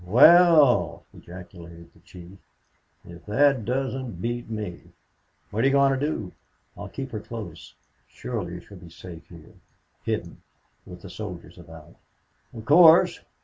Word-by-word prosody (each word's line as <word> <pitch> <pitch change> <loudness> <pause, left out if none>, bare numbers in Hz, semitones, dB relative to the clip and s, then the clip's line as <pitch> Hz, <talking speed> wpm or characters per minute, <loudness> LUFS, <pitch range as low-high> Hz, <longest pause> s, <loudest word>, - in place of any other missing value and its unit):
"Well!" 135 - +5
ejaculated 85 -1 -13
the - - -23
chief. 90 +2 -15 0.7
"If 85 0 -13
that 135 +1 +2
doesn't 130 -5 -4
beat 120 +3 -4
me!... 105 -6 -7 0.6
What 110 +3 -1
are - - +4
you 135 - +1
going 140 -1 +4
to - - -3
do?" 110 -11 -3 0.4
"I'll 100 - -9
keep 135 +4 -7
her 110 - -5
close. 105 - -10 0.3
Surely 90 -8 -6
she 100 - -17
will 95 - -13
be 85 - -13
safe 85 0 -12
here 85 -3 -15 0.5
hidden - - -4 0.5
with 90 -1 -12
the 100 - -10
soldiers 90 -2 -9
about." 80 -2 -15 0.5
"Of 115 -2 -11
course. 160 +4 +6
105 Hz, 145 wpm, -24 LUFS, 85-130 Hz, 0.7 s, course